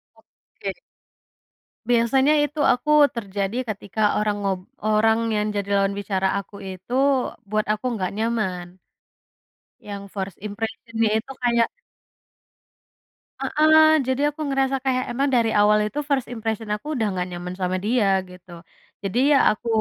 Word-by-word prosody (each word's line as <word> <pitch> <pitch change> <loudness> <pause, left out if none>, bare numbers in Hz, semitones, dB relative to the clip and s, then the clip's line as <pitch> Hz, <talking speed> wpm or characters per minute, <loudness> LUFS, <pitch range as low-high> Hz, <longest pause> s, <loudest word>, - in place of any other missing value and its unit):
Oke. - - -9 1.1
Biasanya 265 +5 +3
itu 295 +1 -4
aku 250 +5 -5 0.3
terjadi 200 -1 -3
ketika 205 0 -6 0.2
orang 210 -1 +1
ngob 195 -2 -1 0.3
orang 220 +1 +3 0.2
yang 210 0 0
jadi 200 0 -2
lawan 195 0 +1
bicara 190 -1 0
aku 200 +1 -11
itu 185 +6 -8 0.6
buat 215 0 0
aku 215 +4 -7
nggak 185 -4 -2
nyaman, 215 -6 -1 1.2
yang 200 -1 -5
first 190 -2 -4
impression-nya 225 +1 -2
itu 270 +4 -10
kayak 235 -1 +3 1.7
Heeh, 315 0 +5
jadi 260 +2 0
aku 310 - -10
ngerasa 270 -1 +1
kayak 255 -1 +1
emang 275 +4 0
dari 230 -2 +2
awal 210 +1 +5
itu 290 +7 -4
first 270 -4 +1
impression 225 -1 -3
aku 210 +8 -10
udah 225 -3 0
nggak 180 -1 -2
nyaman 180 +1 -6
sama 185 0 0
dia, 225 -3 +2 0.2
gitu. 180 -1 -15 0.5
Jadi, 200 +5 -1
ya, 280 - +6
aku 220 +2 -6
220 Hz, 135 wpm, -23 LUFS, 200-245 Hz, 1.7 s, ya